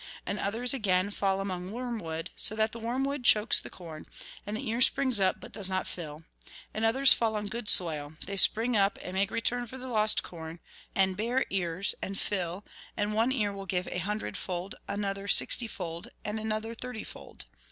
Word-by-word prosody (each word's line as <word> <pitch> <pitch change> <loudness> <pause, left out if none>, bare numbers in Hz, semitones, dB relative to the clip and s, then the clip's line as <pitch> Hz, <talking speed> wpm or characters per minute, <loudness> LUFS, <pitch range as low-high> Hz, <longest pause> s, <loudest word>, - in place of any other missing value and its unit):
And 200 - -3
others, 230 +7 +2
again, 200 -5 +1
fall 195 -1 0
among 185 -1 -4
wormwood, 215 -10 -4
so 215 - +4
that 220 0 +1
the 230 - -8
wormwood 260 +4 -2
chokes 215 -1 +6
the - - -9
corn, 160 -4 -10 0.4
and 210 +1 -3
the - - -5
ear 230 +2 -1
springs 260 -3 +3
up, 190 -1 +2
but - - -10
does 195 -3 -1
not 185 0 -1
fill. 155 -2 -7 0.5
And 215 - -3
others 265 +5 +6
fall 225 -2 0
on 210 0 -2
good 225 -1 -3
soil; 155 -6 +3
they 200 - -4
spring 225 +5 +4
up, 200 -1 +3
and 180 - -6
make 195 +1 +1
return 240 +1 0
for 260 - -9
the 260 0 -7
lost 215 -3 +2
corn, 165 -1 -8 0.4
and 190 -1 +2
bear 235 +6 0
ears, 185 0 +3
and 195 0 -4
fill, 185 -1 -1 0.3
and 205 +1 0
one 225 +4 +2
ear 210 -6 0
will 195 -1 -8
give 180 -1 -1
a 180 - -2
hundredfold, 190 -1 -3
another 200 -1 -3
sixtyfold, 170 -8 +2 0.2
and 210 +1 -2
another 220 +1 -3
thirtyfold. 230 - -8
205 Hz, 185 wpm, -29 LUFS, 185-230 Hz, 0.5 s, chokes